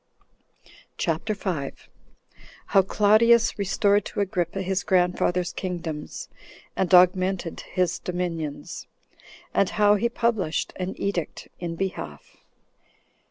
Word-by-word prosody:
CHAPTER 175 +6 -1
5. 175 -9 -4 0.8
How 195 - +6
Claudius 215 +4 +4
Restored 200 +1 +2
To - - -5
Agrippa 190 -1 -1
His 190 +1 0
Grandfathers 180 -1 +1
Kingdoms 170 -5 -5 0.5
And 185 -2 0
Augmented 185 -1 +4 0.2
His 180 -2 +1
Dominions; 170 -5 -4 0.7
And 195 - +3
How 210 -1 +4
He 235 +4 +1
Published 230 -8 -1
An 185 +1 -3
Edict 190 -5 -3
In 170 -1 -4
Behalf. 125 - -5
185 Hz, 100 wpm, -25 LUFS, 175-200 Hz, 0.8 s, How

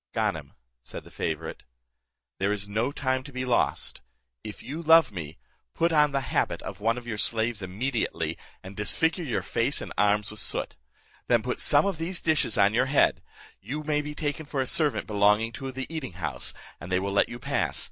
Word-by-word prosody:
"Ganem," - - -1 0.3
said - - -8
the - - -15
favourite, - - -4 0.8
"there 95 +2 +1
is 100 -1 -2
no 110 +6 0
time 130 -2 0
to 140 +2 -11
be 130 -1 -3
lost; 125 -2 +1 0.4
if 105 - -8
you 150 +6 -5
love 165 -4 +6
me, 80 -5 -7 0.4
put 170 +1 +2
on 150 -1 +5
the 135 0 0
habit - - +1
of - - -7
one 115 +3 +1
of 120 - -7
your 110 -3 -4
slaves 115 -1 +1
immediately, 110 +7 -2 0.3
and 95 +1 -9
disfigure 160 - +2
your 125 -8 -1
face - - 0
and - - -6
arms 105 +1 +3
with 105 - -4
soot. - - 0 0.5
Then - - +3
put - - -2
some - - +4
of 195 -5 -1
these 175 +2 -1
dishes 155 -9 +1
on 100 +2 +5
your 125 +3 +3
head; 140 +1 +3 0.4
you 145 +9 -5
may 150 -1 +1
be 150 0 -6
taken 150 0 -3
for 140 - -3
a 130 - +2
servant 150 +2 +2
belonging 105 +1 +3
to 135 +2 -6
the 130 0 -4
eating 155 - -5
house, 90 -2 -4 0.3
and 85 - -8
they 90 - +3
will 100 +1 -2
let 100 - +4
you 120 - -6
pass. - - -1
125 Hz, 200 wpm, -27 LUFS, 105-150 Hz, 0.8 s, love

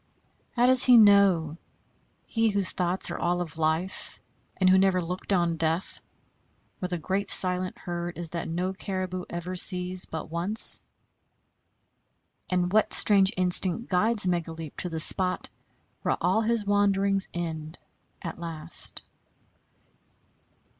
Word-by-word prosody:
How 245 0 +1
does 255 0 +6
he 250 -2 +5
know, 195 -7 +3 0.7
he 225 -1 -1
whose 200 -3 +2
thoughts 180 +1 -3
are - - -7
all 175 +1 -2
of 165 -2 -7
life, 160 +4 -3 0.4
and 185 - 0
who 190 0 +4
never 190 -1 +1
looked 180 +3 -6
on 170 -3 -1
death, 165 +3 -3 0.8
where 180 - -5
the 175 - -4
great 190 +5 -4
silent 185 0 +5
herd 175 0 -7
is 170 -2 -7
that 170 -1 -6
no 180 +3 -4
caribou 185 -2 -6
ever 175 +2 -7
sees 180 0 0
but 160 0 -9
once? 180 +6 +7 1.7
And 180 0 -2
what 215 - +1
strange 195 -2 +3
instinct 185 +4 +1
guides 210 +3 0
Megaleep 165 -3 -5
to 180 - -5
the 165 -1 -6
spot 180 +3 +1 0.5
where - - -2
all 220 - -1
his 225 -1 -2
wanderings 200 -1 -1
end 160 -2 -7 0.5
at 170 0 -8
last? 165 -1 -6
180 Hz, 135 wpm, -25 LUFS, 170-195 Hz, 1.7 s, once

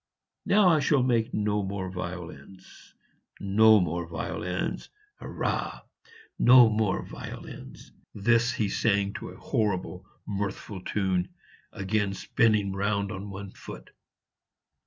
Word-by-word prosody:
Now 200 -2 +5
I 160 -3 +4
shall 140 -2 +2
make 120 -1 +1
no 105 0 0
more 95 -1 -4
violins 90 -1 -9 0.4
no 110 +2 +5
more 85 -1 -2
violins 90 +2 -4 0.3
hurrah! - - -3 0.6
no 125 -2 +8
more 105 -3 0
violins!" - - -10 0.2
This 120 +4 +3
he 110 -7 0
sang 100 -1 +1
to - - -7
a - - -12
horrible 95 -3 -2 0.2
mirthful 100 -1 -4
tune, 95 -3 -1 0.4
again 100 0 -1
spinning 100 +1 +1
round 100 0 -1
on 100 0 -6
one 100 0 -7
foot. - - -11
100 Hz, 115 wpm, -27 LUFS, 95-110 Hz, 0.6 s, no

